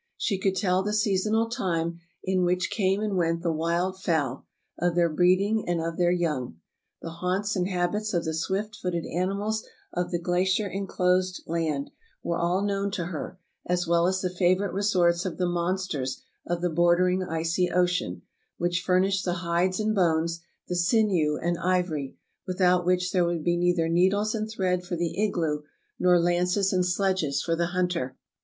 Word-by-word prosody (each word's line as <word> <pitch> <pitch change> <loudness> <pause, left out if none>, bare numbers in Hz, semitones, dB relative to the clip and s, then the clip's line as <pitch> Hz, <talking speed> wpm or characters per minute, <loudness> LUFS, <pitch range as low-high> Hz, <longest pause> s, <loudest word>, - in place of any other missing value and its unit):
She 195 -4 -1
could 190 0 +1
tell 185 -1 +2
the 210 +2 -1
seasonal 215 +1 +1
time 170 -7 -2 0.2
in 185 -1 +1
which 180 +1 0
came 195 -1 +1
and 210 -2 -1
went 165 -1 0
the 170 - +1
wild 170 +4 -1
fowl, 155 -9 -1 0.3
of 175 0 +1
their 170 -1 +3
breeding 190 +6 +3
and 175 -1 +1
of 165 0 -3
their 175 -1 +3
young. 150 - -1 0.5
The 165 - -5
haunts 195 +3 0
and 180 -1 0
habits 195 +3 -1
of 170 -2 0
the 160 - -1
swift 195 +6 -2
footed 180 -4 -3
animals 200 +5 -1 0.3
of 175 0 -1
the 175 - 0
glacier 185 +4 +1
enclosed 185 -1 0
land 155 -4 -2 0.3
were 170 - -1
all 175 +3 +1
known 200 0 0
to 175 -5 -2
her, 155 - -6 0.3
as 180 0 +1
well 170 0 +3
as 190 0 0
the 185 - -1
favorite 185 +1 +1
resorts 180 -3 +2
of 185 -4 -4
the 180 - +1
monsters 175 -6 -2 0.2
of 175 0 -1
the 175 -1 0
bordering 175 +3 +3
icy 165 +1 0
ocean, 175 - 0 0.3
which 175 0 0
furnished 190 +1 +2
the 175 - 0
hides 175 +3 +1
and 215 0 +1
bones, 170 -3 +1 0.3
the 180 - -2
sinew 175 -4 +2
and 175 0 -1
ivory, 175 -6 -1 0.3
without 180 -1 +2
which 180 0 +2
there 180 -2 +3
would 170 -2 -1
be 175 +1 +2
neither 175 -1 +2
needles 190 +5 +2
and 215 -1 -2
thread 185 -4 -1
for 180 0 -4
the 170 +3 -1
igloo, 160 -7 0 0.4
nor 180 -1 +5
lances 180 +3 +1
and 180 -1 +2
sledges 180 -5 0
for 165 - 0
the 170 0 0
hunter. 175 -7 -1
180 Hz, 175 wpm, -26 LUFS, 170-190 Hz, 0.5 s, nor